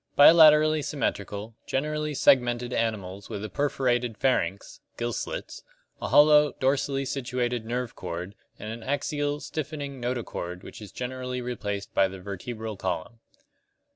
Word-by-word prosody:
Bilaterally 155 Hz, 0 st, +7 dB
symmetrical, 105 Hz, -, -3 dB
generally 150 Hz, +2 st, -1 dB
segmented 120 Hz, -2 st, +3 dB
animals 100 Hz, -4 st, -2 dB
with 100 Hz, -, -5 dB
a -, -, -6 dB
perforated 125 Hz, -4 st, 0 dB
pharynx 100 Hz, -8 st, 0 dB, 0.2 s
(gill 120 Hz, 0 st, -2 dB
slits), -, -, -5 dB, 0.4 s
a -, -, -2 dB
hollow, 150 Hz, +1 st, +6 dB
dorsally 135 Hz, +1 st, 0 dB
situated 125 Hz, -3 st, -2 dB
nerve 120 Hz, 0 st, -3 dB
cord, 90 Hz, +2 st, -5 dB, 0.2 s
and 110 Hz, +2 st, -6 dB
an 115 Hz, -, -8 dB
axial, 145 Hz, +3 st, -1 dB
stiffening 145 Hz, -4 st, -5 dB
notochord 115 Hz, -7 st, -4 dB
which -, -, -10 dB
is 105 Hz, -, -9 dB
generally 125 Hz, 0 st, -4 dB
replaced 105 Hz, -5 st, -4 dB
by 95 Hz, -, +4 dB
the 95 Hz, 0 st, -9 dB
vertebral 105 Hz, +3 st, -6 dB
column. 95 Hz, +4 st, -4 dB
125 Hz, 130 wpm, -27 LUFS, 105-140 Hz, 0.4 s, Bilaterally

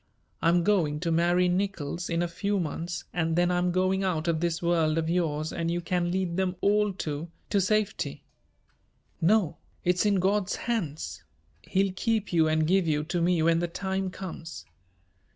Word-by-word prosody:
"I'm 170 Hz, +1 st, +3 dB
going 165 Hz, -7 st, +2 dB
to 170 Hz, -1 st, 0 dB
marry 175 Hz, +2 st, +3 dB
Nickols 180 Hz, -3 st, -2 dB
in 170 Hz, 0 st, +1 dB
a -, -, 0 dB
few 200 Hz, +4 st, -1 dB
months 170 Hz, +1 st, -3 dB
and 165 Hz, -2 st, 0 dB
then 175 Hz, +1 st, +3 dB
I'm 180 Hz, 0 st, +1 dB
going 185 Hz, +2 st, +1 dB
out 170 Hz, -3 st, -1 dB
of 165 Hz, -2 st, +1 dB
this 170 Hz, 0 st, 0 dB
world 165 Hz, -2 st, +1 dB
of 165 Hz, 0 st, 0 dB
yours 155 Hz, -3 st, -1 dB
and 165 Hz, 0 st, -2 dB
you 170 Hz, +1 st, 0 dB
can 175 Hz, 0 st, -1 dB
lead 180 Hz, -1 st, -1 dB
them 185 Hz, -1 st, 0 dB
all 210 Hz, 0 st, +3 dB
to 155 Hz, -2 st, -4 dB, 0.2 s
to 200 Hz, -, +3 dB
safety." 210 Hz, +1 st, -1 dB, 1.0 s
"No, 175 Hz, -2 st, +3 dB, 0.3 s
it's 180 Hz, +1 st, +2 dB
in 205 Hz, -1 st, +3 dB
God's 195 Hz, +1 st, +1 dB
hands. 180 Hz, -11 st, -3 dB, 0.4 s
He'll 195 Hz, 0 st, 0 dB
keep 220 Hz, -1 st, -1 dB
you 160 Hz, -2 st, +4 dB
and 155 Hz, 0 st, +2 dB
give 185 Hz, +1 st, +2 dB
you 150 Hz, -1 st, +1 dB
to 175 Hz, +2 st, -2 dB
me 170 Hz, -1 st, +2 dB
when 165 Hz, 0 st, +3 dB
the 175 Hz, -, 0 dB
time 190 Hz, +2 st, -2 dB
comes. 170 Hz, -4 st, -8 dB
175 Hz, 175 wpm, -27 LUFS, 165-190 Hz, 1.0 s, you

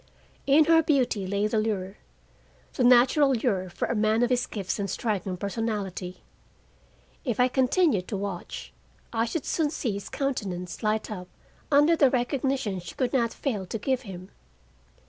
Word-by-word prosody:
In 295 Hz, +3 st, +6 dB
her 325 Hz, 0 st, +6 dB
beauty 255 Hz, -10 st, +1 dB
lay 200 Hz, +2 st, 0 dB
the 215 Hz, +1 st, +1 dB
lure, 200 Hz, -3 st, -2 dB, 0.8 s
the -, -, 0 dB
natural 255 Hz, +3 st, +5 dB
lure 200 Hz, -6 st, -1 dB
for 175 Hz, -, -3 dB
a -, -, -1 dB
man 220 Hz, +1 st, +2 dB
of 245 Hz, -, +1 dB
his 250 Hz, 0 st, +1 dB
gifts 195 Hz, -2 st, -4 dB
and 200 Hz, -1 st, -2 dB
striking 195 Hz, -3 st, -2 dB
personality. 200 Hz, -3 st, -4 dB, 1.0 s
If 245 Hz, -5 st, -2 dB
I 250 Hz, -, +5 dB
continued 260 Hz, -, +2 dB
to 205 Hz, -, -3 dB
watch, 195 Hz, -3 st, -6 dB, 0.4 s
I 225 Hz, 0 st, +1 dB
should 285 Hz, +6 st, -3 dB
soon 315 Hz, -3 st, +1 dB
see 290 Hz, -6 st, -2 dB
his 200 Hz, 0 st, -6 dB
countenance 190 Hz, -10 st, -3 dB
light 215 Hz, 0 st, -1 dB
up 180 Hz, -3 st, -6 dB, 0.4 s
under 295 Hz, +4 st, +5 dB
the 280 Hz, -4 st, +5 dB
recognition 255 Hz, -5 st, -1 dB
she 170 Hz, -1 st, -9 dB
could 255 Hz, 0 st, -1 dB
not 235 Hz, -3 st, +2 dB
fail 210 Hz, -10 st, -3 dB
to 225 Hz, -, -3 dB
give 260 Hz, +4 st, -1 dB
him. 185 Hz, -4 st, -9 dB
225 Hz, 165 wpm, -27 LUFS, 195-260 Hz, 1.0 s, In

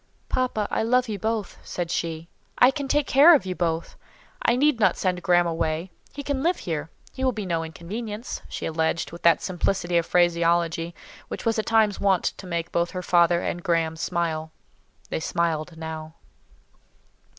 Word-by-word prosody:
"Papa, 245 Hz, -5 st, 0 dB
I -, -, +1 dB
love 250 Hz, +3 st, +2 dB
you 210 Hz, -3 st, -4 dB
both," 220 Hz, 0 st, -2 dB
said 175 Hz, -2 st, -4 dB
she; 165 Hz, -1 st, -3 dB, 0.3 s
"I 250 Hz, -, +6 dB
can 280 Hz, 0 st, -4 dB
take 290 Hz, +1 st, +2 dB
care 295 Hz, +6 st, +7 dB
of 275 Hz, -, 0 dB
you 185 Hz, -, -2 dB
both. 170 Hz, -2 st, -2 dB, 0.5 s
I 235 Hz, -, +3 dB
need 285 Hz, -1 st, +3 dB
not 190 Hz, -5 st, +3 dB
send 180 Hz, -2 st, -1 dB
Graham 175 Hz, -2 st, +4 dB
away—he 170 Hz, -, -4 dB
can 280 Hz, -1 st, -2 dB
live 345 Hz, +4 st, +2 dB
here; 160 Hz, -2 st, -4 dB, 0.2 s
he 265 Hz, -, -5 dB
will 260 Hz, -, +3 dB
be 215 Hz, -3 st, -4 dB
no 165 Hz, -2 st, -1 dB
inconvenience," 210 Hz, +8 st, -6 dB
she -, -, -5 dB
alleged 160 Hz, +1 st, -1 dB
with 170 Hz, -, -10 dB
that 170 Hz, -1 st, +4 dB
simplicity 175 Hz, -1 st, 0 dB
of 170 Hz, -, -4 dB
phraseology 170 Hz, -1 st, +2 dB, 0.3 s
which -, -, -6 dB
at 225 Hz, -1 st, +1 dB
times 220 Hz, -3 st, +3 dB
was -, -, -6 dB
wont 195 Hz, -2 st, +3 dB
to 190 Hz, -, -9 dB
make 170 Hz, -1 st, -3 dB
both 170 Hz, 0 st, +1 dB
her 180 Hz, -1 st, -5 dB
father 175 Hz, -1 st, +4 dB
and 175 Hz, -, -2 dB
Graham 165 Hz, -2 st, 0 dB
smile. 160 Hz, -1 st, -2 dB, 0.6 s
They -, -, -2 dB
smiled 165 Hz, 0 st, -1 dB
now. 160 Hz, 0 st, -7 dB
175 Hz, 175 wpm, -25 LUFS, 165-220 Hz, 0.6 s, care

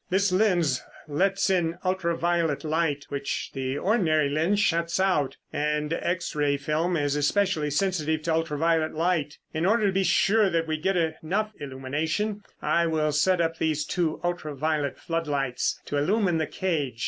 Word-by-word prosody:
This 195 Hz, +1 st, +2 dB
lens 180 Hz, -9 st, +2 dB, 0.3 s
lets 190 Hz, +6 st, +1 dB
in 170 Hz, -2 st, +1 dB
ultra 185 Hz, -2 st, 0 dB
violet 170 Hz, -4 st, 0 dB
light 155 Hz, -2 st, 0 dB
which 140 Hz, 0 st, -3 dB
the 135 Hz, 0 st, -2 dB
ordinary 160 Hz, -7 st, +2 dB
lens 165 Hz, +7 st, +1 dB
shuts 170 Hz, -4 st, +1 dB
out, 180 Hz, -8 st, +1 dB, 0.2 s
and 150 Hz, +1 st, 0 dB
X 170 Hz, 0 st, -2 dB
ray 145 Hz, -1 st, +1 dB
film 155 Hz, +5 st, 0 dB
is 145 Hz, -1 st, 0 dB
especially 155 Hz, +1 st, +1 dB
sensitive 155 Hz, -1 st, 0 dB
to 165 Hz, -, 0 dB
ultra 160 Hz, -2 st, -1 dB
violet 160 Hz, 0 st, +1 dB
light. 160 Hz, -3 st, 0 dB, 0.2 s
In 160 Hz, +1 st, -1 dB
order 215 Hz, +4 st, +3 dB
to 200 Hz, -, +3 dB
be 195 Hz, 0 st, +2 dB
sure 205 Hz, +2 st, +3 dB
that 165 Hz, -2 st, 0 dB
we 155 Hz, -1 st, -2 dB
get 185 Hz, +4 st, 0 dB
enough 170 Hz, +6 st, -1 dB
illumination, 150 Hz, +10 st, -2 dB, 0.2 s
I 170 Hz, 0 st, +2 dB
will 155 Hz, -1 st, +1 dB
set 180 Hz, +5 st, +2 dB
up 165 Hz, -1 st, 0 dB
these 155 Hz, -2 st, 0 dB
two 170 Hz, -4 st, -1 dB
ultra 175 Hz, -4 st, -3 dB
violet 150 Hz, -1 st, -1 dB
floodlights 145 Hz, -6 st, -1 dB
to 145 Hz, -, -2 dB
illumine 180 Hz, +2 st, +2 dB
the 155 Hz, -, -1 dB
cage. 150 Hz, -10 st, -2 dB
165 Hz, 165 wpm, -26 LUFS, 150-185 Hz, 0.3 s, order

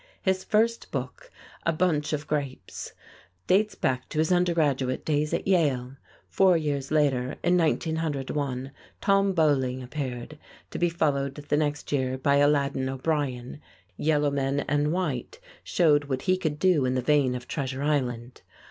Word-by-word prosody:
His 190 Hz, -1 st, +1 dB
first 230 Hz, +2 st, +1 dB
book, -, -, -5 dB, 0.3 s
"A 165 Hz, -, +2 dB
Bunch 155 Hz, -3 st, 0 dB
of 150 Hz, -1 st, -2 dB
Grapes," 140 Hz, -10 st, -4 dB, 0.5 s
dates 210 Hz, +3 st, +2 dB
back 130 Hz, -1 st, -1 dB
to -, -, -6 dB
his 155 Hz, +3 st, +2 dB
undergraduate 155 Hz, -8 st, +1 dB
days 150 Hz, 0 st, 0 dB
at 170 Hz, -, -2 dB
Yale. 135 Hz, -9 st, +1 dB, 0.3 s
Four 190 Hz, -3 st, +4 dB
years 145 Hz, -4 st, -2 dB
later, 140 Hz, -4 st, +1 dB
in 175 Hz, +1 st, +3 dB
1901, 145 Hz, -5 st, -1 dB, 0.3 s
"Tom 195 Hz, 0 st, +3 dB
Beauling" 135 Hz, -6 st, +1 dB
appeared, 130 Hz, +1 st, -5 dB, 0.3 s
to -, -, -5 dB
be 175 Hz, -, +3 dB
followed 140 Hz, -5 st, 0 dB
the 145 Hz, 0 st, -2 dB
next 150 Hz, -1 st, -1 dB
year 130 Hz, -2 st, 0 dB
by 140 Hz, +2 st, +2 dB
"Aladdin 140 Hz, -2 st, +2 dB
O'Brien." 135 Hz, -1 st, -2 dB, 0.3 s
"Yellow 150 Hz, -2 st, +1 dB
Men 140 Hz, 0 st, 0 dB
and 145 Hz, +2 st, 0 dB
White" 180 Hz, -, -3 dB, 0.2 s
showed 150 Hz, -4 st, +3 dB
what 130 Hz, -2 st, -3 dB
he 185 Hz, -1 st, +3 dB
could 160 Hz, -5 st, -2 dB
do 175 Hz, -4 st, +3 dB
in 130 Hz, 0 st, 0 dB
the 130 Hz, -, 0 dB
vein 135 Hz, -2 st, +3 dB
of 125 Hz, -1 st, -7 dB
"Treasure 135 Hz, -2 st, -3 dB
Island." 125 Hz, -5 st, -1 dB
145 Hz, 150 wpm, -26 LUFS, 135-165 Hz, 0.5 s, Four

